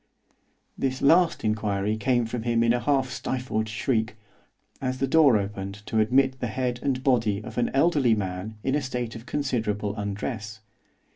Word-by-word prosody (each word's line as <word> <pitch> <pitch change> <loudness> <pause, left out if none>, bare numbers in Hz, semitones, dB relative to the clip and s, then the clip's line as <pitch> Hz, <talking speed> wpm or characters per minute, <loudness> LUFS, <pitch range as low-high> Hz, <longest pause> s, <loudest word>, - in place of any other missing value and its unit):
_' - - -37 0.5
This 130 -1 -1
last 170 +4 +4
inquiry 105 -1 0
came 120 +1 +1
from 115 +1 -4
him 115 0 +1
in 115 0 +4
a 120 - +1
half 135 -1 +1
stifled 125 -4 -2
shriek, 110 0 -1 0.7
as 130 -1 -2
the 135 - +1
door 140 -4 +5
opened 100 0 -5
to 110 - 0
admit 130 +4 +3
the 125 - -2
head 125 +2 -2
and 130 -2 -1
body 115 -7 +2
of - - -5
an 120 - +1
elderly 140 -5 +3
man 95 +2 -4
in 135 - 0
a 145 - +1
state 125 -3 -4
of 115 +1 -10
considerable 110 -8 -1
undress. 110 +1 -4
120 Hz, 170 wpm, -26 LUFS, 110-130 Hz, 0.7 s, door